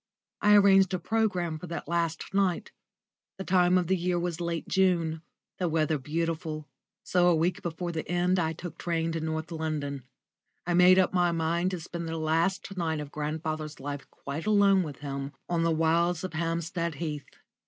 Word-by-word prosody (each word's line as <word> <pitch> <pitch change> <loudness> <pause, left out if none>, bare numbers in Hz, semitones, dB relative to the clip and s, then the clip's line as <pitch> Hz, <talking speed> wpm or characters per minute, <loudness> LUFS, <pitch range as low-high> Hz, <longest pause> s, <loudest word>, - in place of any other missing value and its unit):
I 210 0 +6
arranged 195 -2 +6
a - - 0
programme 180 -8 0
for 180 - -8
that 170 0 -5
last 170 0 -2
night. 195 -3 +1 0.7
The 190 - -4
time 180 -1 +4
of 180 - +1
the 190 +3 +2
year 180 0 0
was 175 -1 -3
late 170 -2 -3
June, 170 -4 +1 0.4
the 180 -2 0
weather 155 -1 +1
beautiful, 155 +1 -3 0.4
so 180 -1 +3
a 175 - +5
week 170 +3 0
before 170 +1 -3
the 160 -2 -5
end 180 +1 +2
I 160 -1 0
took 175 +1 -8
train 165 -1 -1
to 165 - -2
North 160 0 -3
London. 155 -4 -3 0.6
I 175 - 0
made 180 +1 +7
up 185 0 +3
my 175 -1 +3
mind 170 +2 0
to 185 -2 -4
spend 170 0 -6
the 165 - -3
last 165 +5 0
night 160 -4 -1
of 145 -1 -6
grandfather's 155 0 -4
life 140 0 -6
quite 145 +7 -6
alone 200 -2 +5
with 150 -6 -6
him 140 0 -5
on 170 -1 0
the 165 - +2
wilds 165 +2 +2
of 185 - -4
Hampstead 165 +1 -2
Heath. 150 -2 -5
170 Hz, 185 wpm, -28 LUFS, 160-180 Hz, 0.7 s, made